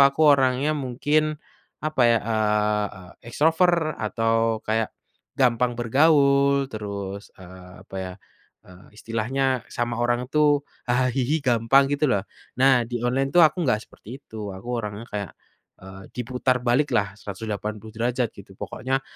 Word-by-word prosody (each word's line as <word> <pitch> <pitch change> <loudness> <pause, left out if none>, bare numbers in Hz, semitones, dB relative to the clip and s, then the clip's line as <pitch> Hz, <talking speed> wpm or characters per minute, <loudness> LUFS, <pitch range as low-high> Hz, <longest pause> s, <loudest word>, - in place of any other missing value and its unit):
aku 140 +2 +4
orangnya 135 +2 +2
mungkin, 150 +3 0 0.5
apa 155 -4 +1
ya? 115 - +4
Eee, 105 -1 +1 0.3
e 115 - -13
extrovert 160 +4 +2
atau 115 0 0
kayak, 110 0 -1 0.4
gampang 125 -1 +2
bergaul 140 +2 +3
terus, 100 -2 -6
eee, 90 0 -13
apa 95 - -10
ya, 95 -1 -5 0.5
eee, 90 +1 -16
istilahnya 125 +3 -1
sama 120 0 -3
orang 120 +2 0
itu 145 -1 +3 0.3
haha 125 +1 +2
hihi 140 +4 0
gampang 130 +2 +3
gitu 145 +1 +1
loh 100 -7 +1 0.3
nah 130 -2 +4
di 120 -1 -4
online 135 +3 0
tuh 175 - +7
aku 165 +1 +3
enggak 110 -4 +1
seperti 130 +7 -12
itu 105 -3 -7
aku 95 +6 -10
orangnya 105 0 -5
kayak, 100 -4 -4 0.5
eee, 95 +1 -11
diputar 125 +1 -1
baliklah 120 -5 +1
180° 110 +3 -3
gitu 100 -1 -14
pokoknya, 135 +1 -3
120 Hz, 135 wpm, -24 LUFS, 110-135 Hz, 0.5 s, tuh